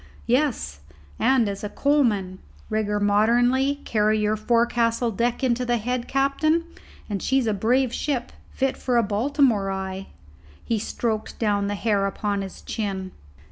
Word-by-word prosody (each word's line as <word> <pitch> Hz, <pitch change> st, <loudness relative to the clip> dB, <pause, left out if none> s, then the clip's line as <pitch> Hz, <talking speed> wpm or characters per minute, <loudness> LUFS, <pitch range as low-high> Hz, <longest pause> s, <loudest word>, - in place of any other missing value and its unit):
"Yes, 240 Hz, -, 0 dB, 0.4 s
and 260 Hz, -4 st, +3 dB
as 200 Hz, 0 st, -4 dB
a 210 Hz, -, -3 dB
coalman. 215 Hz, -10 st, +1 dB, 0.3 s
Rig 215 Hz, -1 st, 0 dB
her 210 Hz, 0 st, 0 dB
modernly, 240 Hz, +6 st, +3 dB
and -, -, -21 dB
carry 215 Hz, 0 st, +2 dB
your 210 Hz, 0 st, +1 dB
forecastle 235 Hz, +1 st, +1 dB
deck 235 Hz, +5 st, -1 dB
into 250 Hz, -1 st, +1 dB
the 240 Hz, -1 st, +1 dB
head, 245 Hz, +2 st, -2 dB
captain, 280 Hz, +5 st, +1 dB, 0.4 s
and 200 Hz, -3 st, -3 dB
she's 265 Hz, -2 st, +1 dB
a 220 Hz, -, +1 dB
brave 240 Hz, +5 st, +1 dB
ship, 265 Hz, -5 st, -2 dB, 0.2 s
fit 270 Hz, 0 st, -1 dB
for 250 Hz, -2 st, 0 dB
a 235 Hz, -, +4 dB
Baltimore 220 Hz, -1 st, +1 dB
eye." 190 Hz, 0 st, -4 dB, 0.6 s
He 225 Hz, -2 st, 0 dB
stroked 220 Hz, 0 st, -3 dB
down 205 Hz, -3 st, +1 dB
the 205 Hz, -, -2 dB
hair 200 Hz, -2 st, +1 dB
upon 200 Hz, 0 st, -2 dB
his 195 Hz, -1 st, -8 dB
chin. 195 Hz, -4 st, -3 dB
225 Hz, 155 wpm, -24 LUFS, 205-250 Hz, 0.6 s, a